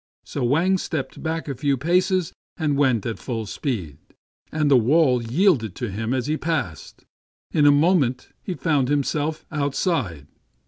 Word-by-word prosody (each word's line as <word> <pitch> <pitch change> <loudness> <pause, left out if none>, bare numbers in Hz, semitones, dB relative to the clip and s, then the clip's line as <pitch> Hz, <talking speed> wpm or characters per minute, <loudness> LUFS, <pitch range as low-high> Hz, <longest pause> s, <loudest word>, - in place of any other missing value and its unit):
So - - -4
Wang 170 +10 +2
stepped 155 -6 -4
back 160 0 -3
a 140 - -2
few 140 +1 0
paces 180 - +1 0.2
and 150 -4 0
went 130 -7 +2
at 115 - -1
it - - -8
full 115 -4 -4
speed; 95 - -4 0.5
and 150 -2 +1
the - - +7
wall 130 +1 +4
yielding 120 - +2
to 120 0 -4
him 110 +4 -3
as 130 -2 0
he 155 +2 0
passed, 155 - -4 0.5
in 145 -2 +4
a - - +8
moment 145 -4 +2
he 185 - -4
found 145 -7 +1
himself 145 +2 -1
outside. 140 - -1
145 Hz, 165 wpm, -23 LUFS, 120-160 Hz, 0.5 s, a